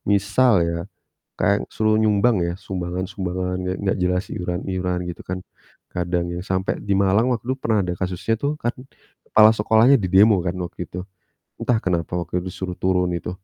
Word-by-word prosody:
misal 105 +5 +3
ya, 85 0 -1 0.6
kayak - - +3 0.2
suruh 110 0 +2
nyumbang 110 +1 +3
ya, 85 - -1
sumbangan-sumbangan 90 0 -3
gak 90 +1 -2
gak 95 - +1
jelas, 90 +1 +1
iuran 90 0 -3
iuran, 90 -1 -1
gitu 85 - -7
kan, 90 0 -2 0.6
kadang 90 0 -1
ya - - -4
sampai 95 0 0
di 100 - +2
Malang 100 +4 +3
waktu 115 - -5
itu 130 - +1
pernah 110 -2 +2
ada 90 -1 -2
kasusnya 90 +4 -1
tuh 145 - +2
kan, 120 - 0 0.5
kepala 110 0 +6
sekolahnya 110 +5 +5
didemo 100 +4 +5
kan 90 - 0
waktu 90 -1 -7
itu. 90 - -7 0.6
Entah 120 -2 +2
kenapa 85 -2 -1
waktu 90 +1 -2
itu, 95 - -5
disuruh 90 0 -5
turun 90 -1 +2
itu, 85 - -5
95 Hz, 175 wpm, -22 LUFS, 90-110 Hz, 0.6 s, kepala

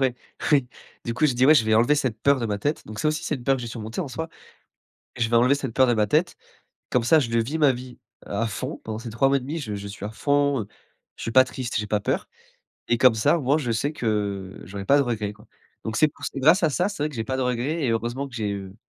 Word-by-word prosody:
ouais, 130 -2 +2 0.4
oui. 140 -4 +4 0.4
Du 115 - -2
coup 155 +5 +3
j'ai 135 - 0
dis: 125 +2 +3
«Ouais, 155 - +8
je 135 - +4
vais 110 - +3
enlever 120 +7 +4
cette 130 -7 -1
peur 140 -2 +4
de 115 - -1
ma 105 -2 -2
tête», 145 +8 -2
donc 105 0 -8
ça 155 - +1
aussi 155 0 -1
c'est - - -1
une 125 -4 -8
peur 135 -1 +3
que 125 - -6
j'ai 120 - -5
surmontée 110 - -5
en 155 - -3
soi. 160 +5 -5 0.9
«Je 115 -2 0
vais 120 - +2
enlever 125 +4 +5
cette 135 -5 -5
peur 130 - +5
de 120 - +3
ma 105 -1 +2
tête, 155 - +1 0.5
comme 125 - +1
ça 160 +4 +6
je 115 -4 0
vis 130 +8 -1
ma 150 -3 +5
vie 125 0 -8 0.3
à 115 +3 -1
fond 130 +8 -5
pendant 110 0 -5
ces 115 0 -7
3 125 +5 +2
mois 140 - +3
et - - -1
1/2 140 +6 -5
je 110 -9 -4
je 100 0 -6
suis 100 0 -9
à 105 - -5
fond, 140 +1 +1
heu, 100 - -7 0.5
je - - -10
suis 115 - -3
pas 130 +3 +7
triste, 130 -1 -5
j'ai 105 -1 -2
pas 105 0 +1
peur, - - -1 0.6
et 120 - +2
comme 125 -3 +5
ça, 110 +9 +3
au - - -4
moins, 140 +4 +3
je 130 -7 -2
sais 115 +6 0
que 100 -6 -2
j'aurais 100 +1 -7
pas 140 +7 +5
de - - +4
regrets 105 -5 -2
quoi», - - -19 0.4
donc 110 - -3
c'est 155 - +5
pou - - -23
c'est - - -4
grâce 160 +8 +5
à 160 - +4
ça, 175 +6 +1
c'est 200 - -7
vrai 150 - 0
que 145 - -11
j'ai 115 - -2
pas 130 +2 -2
de - - -1
regrets 125 +6 -1
et 130 - +1
heureusement 120 +5 -2
que 120 - -11
j'ai, 105 -3 -2
heu, 95 -1 -7
125 Hz, 295 wpm, -24 LUFS, 110-140 Hz, 0.9 s, Ouais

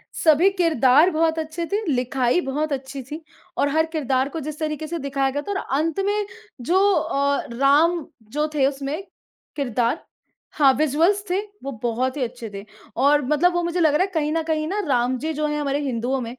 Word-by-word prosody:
सभी 320 +4 +4
किरदार 320 -4 +4
बहुत 320 0 +1
अच्छे 320 +2 -4
थे, 410 +2 +1
लिखाई 255 +4 +1
बहुत 300 +1 -2
अच्छी 270 0 -5
थी 300 +6 -8 0.4
और 285 - +2
हर 320 +2 +2
किरदार 270 -3 0
को 325 - -5
जिस 300 0 -6
तरीके 310 0 -3
से 340 +2 -4
दिखाया 275 -1 -1
गया 290 +2 -2
था - - -2
और 395 - -1 0.2
अंत 325 +4 -1
में 415 +1 0 0.4
जो 340 +10 +1 0.2
अ, 280 -4 0
राम 295 +6 +3 0.3
जो 300 +2 0
थे 275 -3 +3
उसमें 280 +4 -3 0.5
किरदार 245 0 -1 0.5
हाँ 280 -3 +5
विज़ुअल्स 315 +8 +2
थे, 365 +2 +1 0.2
वो 275 - -4
बहुत 245 +2 -1
ही - - -3
अच्छे 240 -1 -6
थे, 200 +1 -7 0.3
और 285 +3 +4
मतलब 300 +6 +2
वो 350 - +1
मुझे 345 +1 -1
लग 315 -3 +4
रहा 300 - +3
है - - -1
कहीं 305 -2 0
न 330 - +1
कहीं 310 -1 -1
ना 395 +5 -2
राम 250 -1 +1
जी 315 +3 -3
जो 305 0 -1
हैं 295 0 -2
हमारे 285 -1 -1
हिन्दुओं 260 -1 -1
में, 235 0 -6
295 Hz, 200 wpm, -22 LUFS, 265-320 Hz, 0.5 s, हाँ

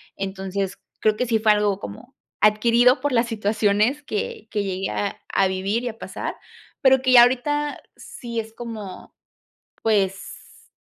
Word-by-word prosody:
entonces, 195 0 -4 0.2
creo 215 -1 +2
que 250 - -1
sí 225 -1 +2
fue 215 0 +4
algo 210 -2 +1
como 195 - -10 0.3
adquirido 235 +4 +4
por 290 +1 -1
las 230 0 +2
situaciones 215 +4 +1
que 455 - -4
que 205 -2 -1
llegué 190 -1 -3
a 200 -1 -3
a 195 - +3
vivir 195 +5 -1
y 245 - -2
a 225 - -9
pasar - - -5 0.5
pero 265 -1 +5
que 260 -1 +2
ya 245 - +10
ahorita 290 +4 0
sí 235 -2 -6
es 220 0 -13
como, 220 -6 -8 0.7
pues, 195 -3 -2
220 Hz, 155 wpm, -23 LUFS, 200-250 Hz, 0.7 s, ya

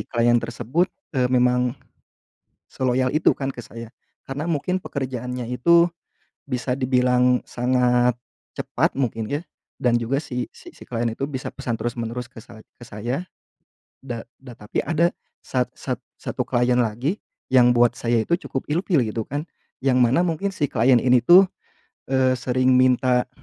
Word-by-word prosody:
klien 120 0 +2
tersebut, 120 +9 -1 0.3
eee, 125 -1 +2
memang 125 0 +3 1.0
seloyal 130 0 0
itu 155 - +4
kan 135 - -3
ke 120 - -8
saya. 115 +1 -10 0.4
Karena 135 +2 -4
mungkin 175 +4 0
pekerjaannya 125 -3 -4
itu, 170 +8 +5 0.6
bisa 125 0 -1
dibilang 125 -1 +3
sangat 125 -1 +2 0.4
cepat - - 0
mungkin 115 -4 -2
ya 145 +4 -2 0.3
dan 120 -1 +2
juga 120 +4 0
si 125 -4 -4
si 350 -1 -14
si - - -15
klien 120 -1 -2
itu 115 +3 -6
bisa 130 -2 -4
pesan 120 -4 -3
terus-menerus 120 +1 -4
ke 115 -2 -12
sa 110 - -14 0.2
ke 120 - -13
saya, 120 - -4 0.8
da 120 -4 -5 0.2
da 130 -2 -12
tapi 105 -2 -6
ada 170 +2 +2 0.3
sat 125 -1 -1
sat 130 -3 -4 0.2
satu 125 - -3
klien 125 -1 +2
lagi 125 - 0 0.3
yang 125 -2 +6
buat 120 0 +3
saya 115 -1 +1
itu 170 +9 +1
cukup 135 - -4
ilfil 170 0 +2
gitu 110 +1 -3
kan. 145 +2 -3 0.4
Yang 130 -1 +3
mana 125 +6 +3
mungkin 180 +3 -1
si 145 -5 0
klien 120 +1 +4
ini 125 -1 +4
tuh, 185 +6 +8 0.6
eee, 130 -1 +3
sering 130 +1 +1
minta 125 0 +3
125 Hz, 155 wpm, -23 LUFS, 120-135 Hz, 1.0 s, tuh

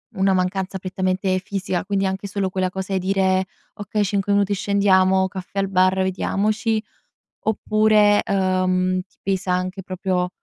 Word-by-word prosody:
una 190 0 +2
mancanza 190 +1 -1
prettamente 185 0 -1
fisica, 190 -1 -3
quindi 195 -1 0
anche 190 +1 -3
solo 195 -1 -2
quella 185 0 -1
cosa 190 +1 -5
e 190 - +1
dire: 190 0 +1 0.3
"Okay, 205 +1 -2
cinque 200 0 0
minuti 200 0 +2
scendiamo, 190 -1 +3
caffè 190 +1 -6
al 195 0 0
bar, 185 0 +3
vediamoci", 215 +4 0 0.6
oppure, 215 -1 +3
uhm, 185 -1 +1
ti - - -35
pesa 190 -1 -1
anche 185 +1 -2
proprio, 185 -1 -2
190 Hz, 145 wpm, -22 LUFS, 185-200 Hz, 0.6 s, scendiamo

